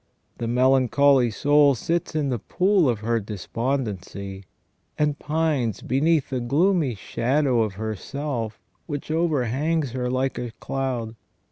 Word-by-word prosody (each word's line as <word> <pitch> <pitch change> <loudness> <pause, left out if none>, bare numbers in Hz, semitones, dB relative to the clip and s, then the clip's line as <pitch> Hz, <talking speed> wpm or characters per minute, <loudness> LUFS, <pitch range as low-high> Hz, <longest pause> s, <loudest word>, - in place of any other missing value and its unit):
The 115 - -2
melancholy 130 +1 +4
soul 145 +5 +4
sits 165 +7 -2
in 150 -3 0
the 125 -3 -1
pool 185 - +2
of 115 -4 -1
her 115 +1 +1
despondency, 105 -2 -4 0.5
and 150 -1 0
pines 150 - -1
beneath 145 +3 +1
the 130 - 0
gloomy 150 - +2
shadow 125 +4 +1
of 110 -3 -1
her 110 +1 -3
self 120 -3 -4 0.3
which 145 -1 -5
overhangs 155 -2 0
her 125 0 -2
hke 130 -1 -1
a - - -9
cloud. 125 -5 -3
130 Hz, 130 wpm, -24 LUFS, 115-150 Hz, 0.5 s, melancholy